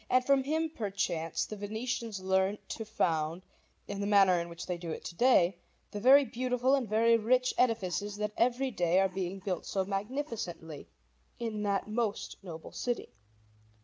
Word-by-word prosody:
And 255 0 +3
from 275 0 +4
him, 315 +2 0
perchance, 195 - -2
the 215 - -7
Venetians 220 +1 -3
learnt 190 +2 0
to 225 - -4
found, 165 -5 -1 0.4
in 200 0 -4
the 200 - -1
manner 195 -4 +5
in 170 - -6
which 170 0 -7
they 180 - -2
do 170 -1 -6
it 160 - -5
to 170 - -6
day, 195 -6 +4 0.3
the 205 - -4
very 270 +5 +7
beautiful 250 +2 0
and 265 -6 +1
very 230 +2 +4
rich 250 +3 +2
edifices 205 -4 0
that 210 0 -3
every 250 +3 +1
day 175 -3 +2
are 195 - +4
being 185 0 -3
built 190 -2 -3
so 190 -1 -1
magnificently 200 - -4 0.5
in 225 -3 -3
that 200 -1 0
most 215 -1 -2
noble 165 -4 -9
city. 245 - -3
210 Hz, 170 wpm, -31 LUFS, 185-240 Hz, 0.5 s, very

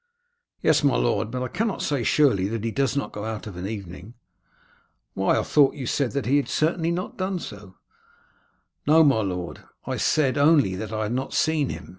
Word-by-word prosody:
"Yes, - - +3
my 140 - +3
lord. 115 -2 0
But 125 +2 -3
I - - -2
cannot 215 - -2
say 140 -4 0
surely 115 -7 +3
that 110 0 -4
he 115 - -1
does 140 +3 0
not 140 - -2
go 105 - -6
out 110 -1 -5
of 105 -4 -8
an 90 +2 -5
evening." 100 +1 -8 1.0
"Why, 95 - +1
I - - +1
thought 145 -3 +3
you 135 - -5
said 130 +1 -1
that 140 -1 -2
he 140 +4 +3
certainly 160 +3 0
had 170 - 0
not 180 - -5
done 185 0 -1
so?" 100 - -9 1.1
"No, 160 +2 +6
my 135 -7 +3
lord; 90 -3 -4 0.2
I - - -3
said 140 -2 +1
only 145 - +4
that 105 +3 -5
I 110 0 -2
had 110 +2 -2
not 130 +2 -3
seen 155 -4 +1
him. - - -7
130 Hz, 205 wpm, -24 LUFS, 105-150 Hz, 1.1 s, No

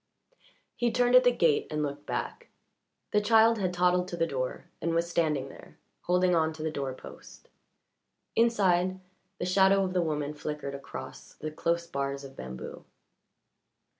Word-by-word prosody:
He 240 -1 +1
turned 245 0 +2
at 255 0 +8
the 245 - +5
gate 165 -10 +2
and 150 -1 -1
looked 145 0 -5
back. - - -4 0.6
The 210 - +3
child 225 +1 +5
had 185 -2 0
toddled 180 0 +2
to 175 -2 -5
the 165 - +2
door 130 -5 -3 0.2
and 165 0 0
was 170 +1 +1
standing 150 -6 0
there, - - -14 0.3
holding 180 0 +3
on 160 -1 +2
to 155 0 -7
the 160 - -1
door 135 -3 -3
post. - - -13 0.9
Inside, 190 -5 +2 0.4
the - - -3
shadow 190 +1 +4
of 185 -1 -2
the 180 - +2
woman 150 -3 -2
flickered 150 -2 -5
across 140 0 -9
the 155 - -6
close 170 +2 -1
bars 140 -3 -3
of 135 -1 -11
bamboo. 65 0 -8
170 Hz, 165 wpm, -29 LUFS, 150-185 Hz, 0.9 s, at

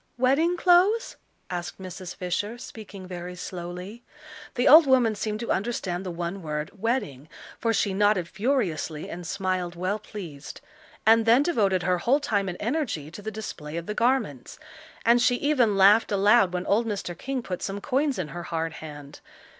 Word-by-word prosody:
"Wedding 285 +8 +2
clothes?" 375 +7 +3 0.4
asked 175 -1 -5
Mrs. 185 -1 -8
Fisher, 205 +5 -3
speaking 205 -5 -10
very 180 0 -7
slowly. 180 +5 -7 0.5
The 245 - +1
old 310 +1 +9
woman 250 -4 +4
seemed 215 0 -3
to 235 - -2
understand 190 -4 -2
the 185 - -5
one 175 +2 -4
word 150 -1 -4
"wedding," 195 - -2 0.3
for 230 - +1
she 200 -2 +1
nodded 205 -3 +2
furiously 190 - -2
and 175 -1 -7
smiled 185 -2 -2
well 185 +4 -2
pleased; 170 -10 -9 0.5
and 225 +1 +5
then 240 +5 +6
devoted 200 - +1
her 180 -1 +1
whole 260 +10 +3
time 200 -8 0
and 180 - -5
energy 230 - -2
to 190 - -9
the 215 - -4
display 170 -8 -6
of 170 - -4
the 210 - -3
garments. 230 - 0 0.5
And 235 +1 +5
she 245 +1 +4
even 245 -7 +2
laughed 205 +4 +6
aloud 200 0 +4
when 180 0 -3
old 225 +3 +2
Mr. 195 -5 -4
King 260 +6 -4
put 180 -4 -5
some 200 0 -3
coins 275 +4 0
in 175 -5 -3
her 175 - -6
hard 165 -1 -2
hand. 145 -2 -10
200 Hz, 170 wpm, -26 LUFS, 175-235 Hz, 0.5 s, old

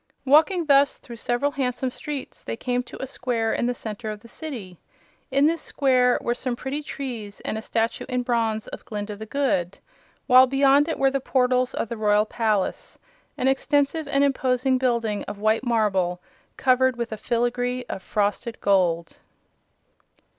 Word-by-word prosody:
Walking 320 +6 +4
thus 280 -1 +4
through 235 -2 -11
several 245 +5 0
handsome 255 -2 -2
streets 290 +1 -7
they - - -5
came 250 0 -1
to - - -11
a - - -1
square 245 -4 -1
in 240 - 0
the 245 - 0
center 220 0 -5
of 210 -1 -6
the 230 - -14
City. 230 - -8 0.5
In 275 +2 +3
this 325 +1 +2
square 255 -3 +2
were 240 - 0
some 245 0 -3
pretty 265 +4 -4
trees 240 -8 -6
and - - -3
a 220 - -3
statue 225 +1 -2
in 250 -1 -1
bronze 225 -3 0
of - - -9
Glinda 210 -1 -5
the 220 +2 -9
Good, 215 -10 0 0.5
while 255 0 +7
beyond 275 +2 +4
it 325 - -2
were 270 0 +3
the 275 - 0
portals 255 -1 +1
of - - -2
the 235 - -5
Royal 210 0 +3
Palace 215 -3 -1 0.4
an 255 - 0
extensive 285 +3 +1
and 275 0 +2
imposing 260 -1 +1
building 235 -5 0
of 205 - -6
white 215 +3 +1
marble 195 -7 +1 0.4
covered 260 -1 +3
with 235 -1 -3
a - - -2
filigree 245 +2 -1
of - - -5
frosted 210 +3 -2
gold. 175 -4 +1
245 Hz, 170 wpm, -24 LUFS, 220-270 Hz, 0.5 s, while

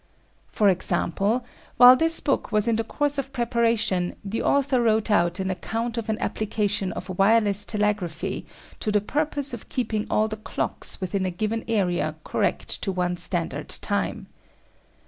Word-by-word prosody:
For 210 - +1
example, 195 +5 0 0.3
while 250 +1 +9
this 325 +4 +5
book 275 -4 -1
was 215 +1 +4
in 230 - +2
course 285 +5 -1
of 270 0 -5
preparation 230 -7 0
the 205 +3 -3
author 275 -2 +1
wrote 220 -1 +1
out 175 -2 +2
an 190 0 -1
account 225 +5 -4
of 230 -2 -4
an 215 - 0
application 210 -3 -1
of 185 0 -7
wireless 205 0 +3
telegraphy 210 -6 -2 0.3
to 215 - -1
the 210 - +3
purpose 285 +4 +1
of 235 - -8
keeping 220 -4 -2
all 215 - +2
the 215 0 -6
clocks 215 - +1
within 190 +1 -2
a 185 - -1
given 215 +5 -3
area 180 -8 0
correct - - -2
to 195 - -1
one 180 -1 -1
standard - - -2
time. - - -3
215 Hz, 155 wpm, -24 LUFS, 190-235 Hz, 0.3 s, while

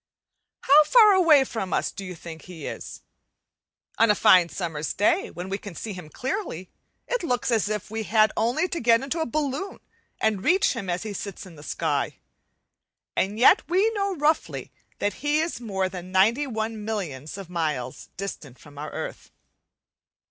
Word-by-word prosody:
How 295 +3 +7
far 435 +3 +7
away 330 -7 +6
from 195 -9 -4
us - - 0
do 195 - -8
you 185 -1 -7
think 160 -1 -9
he 170 -5 -9
is? - - -7 1.0
On 230 - +5
a 210 - +5
fine 185 -5 +6
summer's 160 -5 -3
day 335 - +2
when 180 +1 -7
we 195 +1 -3
can 200 -5 -9
see 215 +4 -5
him 180 -4 -9
clearly, 255 - -4 0.4
it - - -1
looks 250 -6 -1
as 220 -3 +2
if 210 -1 -4
we 220 0 -2
had 215 0 +3
only 245 +11 +1
to 340 - -3
get 230 0 +4
into 280 +5 -2
a 320 - -1
balloon 295 +7 -3 0.4
and 215 -3 0
reach 375 +3 +3
him 225 -7 -5
as 175 +2 -1
he 215 -2 -5
sits 200 -1 -6
in 180 -3 -13
the 145 - -13
sky, 150 - -1 1.0
and 200 +3 0
yet 245 - +6
we 385 +6 +3
know 400 -3 -1
roughly 305 +1 0 0.3
that 205 - -1
he 295 +1 +2
is 320 -6 -2
more 195 -5 -1
than 180 -1 -8
ninety 225 +10 +3
one 220 -2 -3
millions 170 -9 -4
of 195 -3 -8
miles 155 -8 -3
distant 155 -9 -6
from 145 -1 -14
our 150 - -5
earth. - - -7
215 Hz, 180 wpm, -25 LUFS, 180-285 Hz, 1.0 s, How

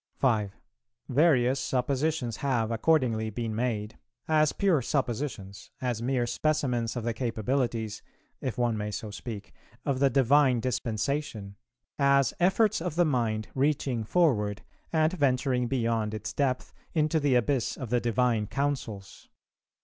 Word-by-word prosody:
5. 110 -6 +1 0.5
"Various 135 -2 +3
suppositions 130 -1 -1
have, 120 -5 0
accordingly, 115 -3 +2
been 115 +1 -3
made, 110 -2 -2 0.3
as 155 -1 +3
pure 185 -8 +2
suppositions, 120 -6 -3
as 120 -3 -2
mere 125 0 0
specimens 125 -4 0
of 120 - -3
the 115 0 -1
capabilities 115 -1 -2 0.4
(if 130 - -3
one 120 -2 +1
may 105 0 -3
so 105 0 -5
speak) 105 -1 -7 0.3
of 135 -3 0
the 140 0 +4
Divine 135 0 +4
Dispensation, 115 -2 -2 0.4
as 140 -2 +4
efforts 195 +3 +3
of 170 -3 -3
the 175 0 +4
mind 115 -7 0
reaching 135 -4 0
forward 105 - +1 0.3
and 160 +1 +2
venturing 130 -5 +1
beyond 115 -4 0
its 105 0 -5
depth 130 -3 -1 0.2
into 155 0 +2
the 140 -3 +2
abyss 125 +1 +1
of 125 -5 -6
the 120 -1 +2
Divine 120 -2 +1
Counsels. 125 -7 -4
125 Hz, 135 wpm, -28 LUFS, 110-140 Hz, 0.5 s, the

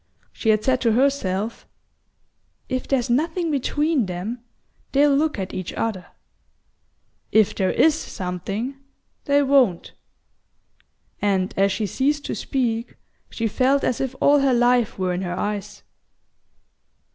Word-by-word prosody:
She 220 - -2
had 215 -1 +3
said 255 -1 +1
to 230 -3 +2
herself: 230 -5 0 1.0
"If 255 -1 -3
there's 265 -3 +1
nothing 320 +6 0
between 290 - 0
them, 200 +7 -5 0.5
they'll 285 0 +4
look 305 0 +1
at 190 -1 -4
each 185 -2 -5
other; 200 -6 -3 1.2
if 215 -2 +4
there 190 -1 0
IS 315 - +4
something, 200 - -4 0.5
they 285 0 +3
won't;" 265 -11 +2 1.3
and 195 -2 +1
as 195 +1 +3
she 215 +3 -1
ceased 285 +8 0
to - - -3
speak 235 -4 -2 0.3
she 230 - -2
felt 265 +5 +2
as 250 - 0
if 265 -1 -3
all 290 0 +5
her 270 -2 +3
life 245 -1 +2
were 185 -1 -1
in 180 - -2
her 180 -1 -3
eyes. 205 0 -4
240 Hz, 135 wpm, -22 LUFS, 200-275 Hz, 1.3 s, all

